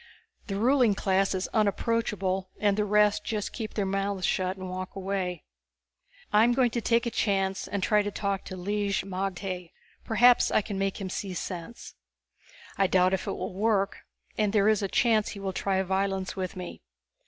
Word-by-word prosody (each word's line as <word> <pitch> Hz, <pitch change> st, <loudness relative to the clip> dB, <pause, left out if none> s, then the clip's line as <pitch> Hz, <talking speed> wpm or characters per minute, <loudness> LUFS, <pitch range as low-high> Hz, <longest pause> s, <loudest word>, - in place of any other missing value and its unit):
The 195 Hz, -, -3 dB
ruling 240 Hz, 0 st, +3 dB
class 195 Hz, 0 st, +1 dB
is 185 Hz, -, -2 dB
unapproachable 205 Hz, -3 st, 0 dB
and 205 Hz, -1 st, +2 dB
the 210 Hz, 0 st, +1 dB
rest 210 Hz, 0 st, +3 dB
just 210 Hz, -1 st, -3 dB
keep 220 Hz, -3 st, -5 dB
their 205 Hz, -, 0 dB
mouths 195 Hz, -1 st, -1 dB
shut 185 Hz, +1 st, 0 dB
and 185 Hz, 0 st, -6 dB
walk 185 Hz, 0 st, -6 dB
away._ 190 Hz, -3 st, -3 dB, 0.9 s
_I'm 230 Hz, +3 st, +5 dB
going 250 Hz, -2 st, +3 dB
to 235 Hz, -, -2 dB
take 230 Hz, +2 st, +2 dB
a 235 Hz, -, -1 dB
chance 195 Hz, -3 st, 0 dB
and 200 Hz, -2 st, -3 dB
try 210 Hz, 0 st, +4 dB
to 205 Hz, -, -2 dB
talk 200 Hz, -1 st, -2 dB
to 185 Hz, -, -7 dB
Lig 200 Hz, +1 st, -1 dB
magte, 185 Hz, -2 st, -4 dB, 0.3 s
perhaps 245 Hz, +2 st, +5 dB
I -, -, +2 dB
can 200 Hz, -2 st, -4 dB
make 195 Hz, 0 st, -1 dB
him 190 Hz, -2 st, -4 dB
see 190 Hz, -2 st, -4 dB
sense. 180 Hz, +5 st, -6 dB, 0.9 s
I 195 Hz, -, +4 dB
doubt 185 Hz, 0 st, +3 dB
if 190 Hz, -, -2 dB
it -, -, -1 dB
will -, -, -5 dB
work 200 Hz, 0 st, +1 dB, 0.4 s
and 210 Hz, -2 st, +2 dB
there 210 Hz, -1 st, +4 dB
is 215 Hz, -1 st, +2 dB
a 200 Hz, -, 0 dB
chance 220 Hz, +1 st, +2 dB
he 200 Hz, -, -7 dB
will 195 Hz, -1 st, -3 dB
try 190 Hz, 0 st, 0 dB
violence 190 Hz, 0 st, -1 dB
with 185 Hz, -1 st, -4 dB
me. 180 Hz, -1 st, -7 dB
195 Hz, 185 wpm, -28 LUFS, 190-210 Hz, 0.9 s, I'm